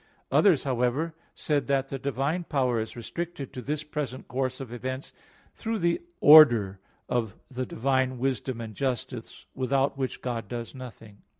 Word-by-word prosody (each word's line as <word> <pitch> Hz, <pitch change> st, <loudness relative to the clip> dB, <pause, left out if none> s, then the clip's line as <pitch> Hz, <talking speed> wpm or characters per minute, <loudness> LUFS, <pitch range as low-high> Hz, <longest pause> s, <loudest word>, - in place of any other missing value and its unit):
Others, 180 Hz, -10 st, +5 dB
however, 130 Hz, +5 st, 0 dB, 0.2 s
said 145 Hz, -3 st, 0 dB
that 135 Hz, -1 st, +1 dB
the 135 Hz, -, -4 dB
divine 140 Hz, +6 st, -1 dB
power 130 Hz, -6 st, +1 dB
is 110 Hz, +2 st, -4 dB
restricted 145 Hz, +3 st, -5 dB
to 130 Hz, -, -5 dB
this 150 Hz, +4 st, -2 dB
present 145 Hz, -4 st, -5 dB
course 130 Hz, 0 st, -2 dB
of 130 Hz, -3 st, -7 dB
events 130 Hz, +3 st, -5 dB, 0.4 s
through 225 Hz, 0 st, -3 dB
the 170 Hz, -3 st, +1 dB, 0.2 s
order 120 Hz, -11 st, +8 dB, 0.3 s
of 115 Hz, -5 st, -1 dB, 0.2 s
the 130 Hz, -1 st, -3 dB
divine 130 Hz, +1 st, 0 dB
wisdom 130 Hz, -1 st, -1 dB
and 110 Hz, -1 st, -6 dB
justice 125 Hz, -1 st, -4 dB
without 135 Hz, +1 st, 0 dB
which 130 Hz, -1 st, -3 dB
God 115 Hz, -4 st, -3 dB
does 120 Hz, 0 st, -5 dB
nothing. 115 Hz, -5 st, -11 dB
130 Hz, 155 wpm, -27 LUFS, 120-140 Hz, 0.4 s, order